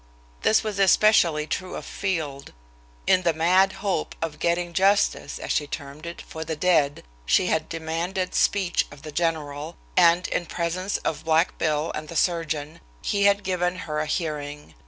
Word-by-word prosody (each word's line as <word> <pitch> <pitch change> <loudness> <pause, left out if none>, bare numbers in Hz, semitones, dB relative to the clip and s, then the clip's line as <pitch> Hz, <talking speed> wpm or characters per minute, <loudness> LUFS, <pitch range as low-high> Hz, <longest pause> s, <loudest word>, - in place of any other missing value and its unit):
This 220 - +3
was 210 -2 -3
especially 185 -6 +4
true 180 +4 -4
of - - -6
Field. 155 -8 -3 0.5
In 185 - +4
the 170 -3 +1
mad 185 +4 +4
hope 195 - -1
of 160 -2 -4
"getting 170 0 0
justice," 195 +3 +2
as - - -5
she 145 - 0
termed 145 +2 -7
it, 170 - -7
for 160 - -7
the 160 0 -4
dead, 155 -4 +2 0.2
she 185 - +4
had 160 0 -1
demanded 170 +3 -3
speech 190 -4 +2
of 140 -1 -14
the 155 - -7
general, 155 -1 -2 0.2
and, 175 0 +5
in 175 - -2
presence 180 +4 -2
of 155 - -2
"Black 160 +2 +2
Bill" 155 0 0
and 155 0 -5
the 170 - -8
surgeon, 160 -3 -1 0.2
he 200 0 +1
had 200 0 +4
given 180 -1 0
her 150 -1 -2
a 155 - -1
hearing. 150 -3 -4
165 Hz, 170 wpm, -25 LUFS, 155-185 Hz, 0.5 s, and